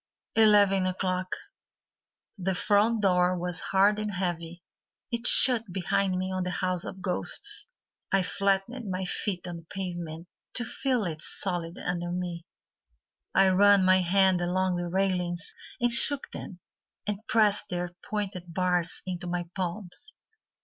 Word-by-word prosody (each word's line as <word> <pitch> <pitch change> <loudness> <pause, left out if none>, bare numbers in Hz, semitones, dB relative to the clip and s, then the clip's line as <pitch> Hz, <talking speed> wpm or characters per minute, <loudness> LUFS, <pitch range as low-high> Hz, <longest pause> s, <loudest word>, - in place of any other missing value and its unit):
Eleven 205 -3 +5
O'Clock 185 0 -1 1.1
The 190 -2 -2
front 210 +4 +2
door 180 -1 +3
was 175 0 -4
hard 200 +2 +2
and 210 0 -2
heavy, 175 -1 -3 0.5
It 235 +1 +1
shut 230 -6 +7
behind 185 +1 0
me 185 +1 -2
on 185 0 -2
the 180 - -2
house 185 -1 -1
of 190 - -8
ghosts. 200 - -1 0.4
I 195 -1 +3
flattened 200 +5 -1
my 185 0 -2
feet 185 0 -2
on 175 -1 -5
the 165 - -13
pavement 175 -3 -5 0.3
To 240 - 0
feel 255 0 -1
it 155 -3 -4
solid 175 -3 -1
under 175 -1 -3
me; 175 -2 -4 0.9
I 195 0 +6
ran 200 0 +5
my 185 0 +5
hand 185 0 +3
along 180 +1 0
the 175 0 -3
railings 180 -2 -1 0.3
And 240 -1 +1
shook 280 +3 +1
them, 180 -2 -8 0.4
And 210 -1 -2
pressed 215 -2 +2
their 175 0 -3
pointed 190 -4 -4
bars 180 -2 0
Into 180 -1 -4
my 175 -1 -3
palms. 190 - -5
185 Hz, 140 wpm, -28 LUFS, 175-200 Hz, 1.1 s, shut